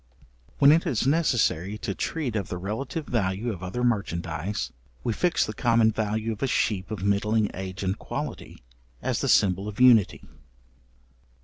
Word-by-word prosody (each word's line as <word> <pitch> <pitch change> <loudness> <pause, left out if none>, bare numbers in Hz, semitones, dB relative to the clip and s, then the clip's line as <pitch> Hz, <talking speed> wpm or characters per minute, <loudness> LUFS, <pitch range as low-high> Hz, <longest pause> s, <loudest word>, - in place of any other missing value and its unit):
When 140 +1 +7
it 165 +3 +3
is 125 -7 0
necessary 120 - +1
to 110 -2 -3
treat 135 +1 -3
of 100 -4 -2
the 90 - -3
relative 120 - -4
value 110 0 -1
of 90 - -10
other 95 +7 -3
merchandize, 85 - -2 0.3
we 115 - 0
fix 175 +8 +1
the 110 - -5
common 115 0 +3
value 110 +1 -2
of 110 - -7
a 135 - +1
sheep 105 -6 0
of 105 -3 -5
middling 105 +2 +1
age 95 +1 -6
and 95 +2 -1
quality, - - -6 0.4
as - - -1
the - - 0
symbol 95 +1 +3
of 105 +1 -7
unity. 120 -6 +5
105 Hz, 165 wpm, -26 LUFS, 95-120 Hz, 0.4 s, When